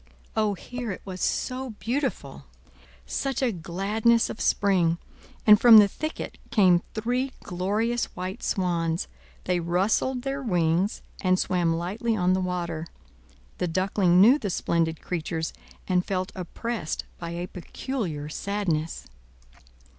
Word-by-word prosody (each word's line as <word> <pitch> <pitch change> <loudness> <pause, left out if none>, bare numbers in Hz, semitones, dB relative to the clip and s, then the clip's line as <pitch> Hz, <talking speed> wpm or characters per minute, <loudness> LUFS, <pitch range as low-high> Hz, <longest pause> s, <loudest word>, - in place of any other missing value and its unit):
Oh, 215 -2 +1
here 245 +4 -6
it 185 - -5
was 185 -2 -6
so 255 -3 -2
beautiful, 270 +5 -3 0.6
such 270 -1 -2
a 250 - +2
gladness 210 +6 +1
of - - -8
spring! 180 -5 +2 0.5
and 210 -1 +8
from 235 -2 +10
the 205 -1 +8
thicket 310 - -5
came 180 -5 +5
three 250 +4 -1
glorious 210 +6 0
white 185 +5 -5
swans; 170 -3 0 0.4
they 180 -1 +1
rustled 195 +9 +1
their 275 +1 -2
wings, 180 -3 +1 0.2
and 185 -1 +3
swam 175 -3 +1
lightly 205 +7 -1
on 180 -1 +3
the 185 - +1
water. 175 -3 -3 0.7
The 180 - 0
Duckling 185 +1 +2
knew 240 +9 +7
the 205 - -3
splendid 165 -2 0
creatures, 165 -2 -3 0.3
and 180 -1 +2
felt 185 -1 -2
oppressed 190 +1 -4
by 170 -1 -5
a 175 +1 -3
peculiar 180 - -4
sadness. 170 -2 -2
190 Hz, 130 wpm, -26 LUFS, 175-225 Hz, 0.7 s, from